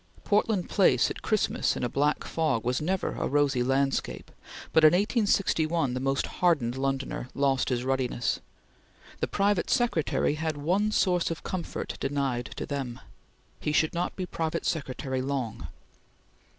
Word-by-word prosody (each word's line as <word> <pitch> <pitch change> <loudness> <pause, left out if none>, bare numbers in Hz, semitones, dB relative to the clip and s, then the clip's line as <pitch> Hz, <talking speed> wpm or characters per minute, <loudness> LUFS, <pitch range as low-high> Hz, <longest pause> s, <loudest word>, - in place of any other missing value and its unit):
Portland 205 -2 +1
Place 135 - +3
at - - -7
Christmas 215 -2 +1
in - - -4
a - - +2
black 145 +5 +1
fog 155 -8 0
was 125 +3 0
never 185 +4 -1
a - - -2
rosy 140 -3 +2
landscape, 135 +2 0 0.4
but 160 - +5
in 155 - +8
1861 175 - +1
the 130 - -2
most 135 +1 0
hardened 145 -10 +1
Londoner 135 -1 -2
lost 135 -1 +1
his 125 -2 0
ruddiness. 130 -2 0 0.8
The - - 0
private 200 -2 +1
secretary 235 - +1
had 155 0 -2
one 185 +9 +1
source 180 -4 +2
of 165 - -5
comfort 185 -3 -4
denied 135 -3 -1
to - - -4
them 135 -4 -4 0.6
he 150 - -1
should 155 +1 +2
not 175 +1 -2
be 185 - -3
private 165 -1 -3
secretary 130 -4 -2
long. 130 -4 -3
145 Hz, 150 wpm, -28 LUFS, 130-175 Hz, 0.8 s, in